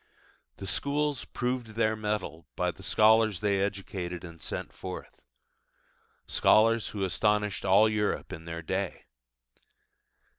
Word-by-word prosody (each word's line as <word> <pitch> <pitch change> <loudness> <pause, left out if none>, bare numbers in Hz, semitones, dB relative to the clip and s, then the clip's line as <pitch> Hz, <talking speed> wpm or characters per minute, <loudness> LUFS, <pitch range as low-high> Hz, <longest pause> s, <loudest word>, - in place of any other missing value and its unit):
The 95 - -7
schools 140 +8 0
proved 125 -3 -3
their 110 -1 +2
mettle 105 -8 -3
by - - 0
the - - -16
scholars 110 -2 +4
they 100 -2 +1
educated 95 -3 -3
and 85 -2 -10
sent - - -5
forth: - - -8 1.0
scholars 115 +1 +4
who 100 -2 -4
astonished 105 +1 +1
all 100 +3 +6
Europe 105 -1 -1
in 80 - -8
their 85 0 -6
day. 95 +1 -3
105 Hz, 120 wpm, -29 LUFS, 95-110 Hz, 1.0 s, all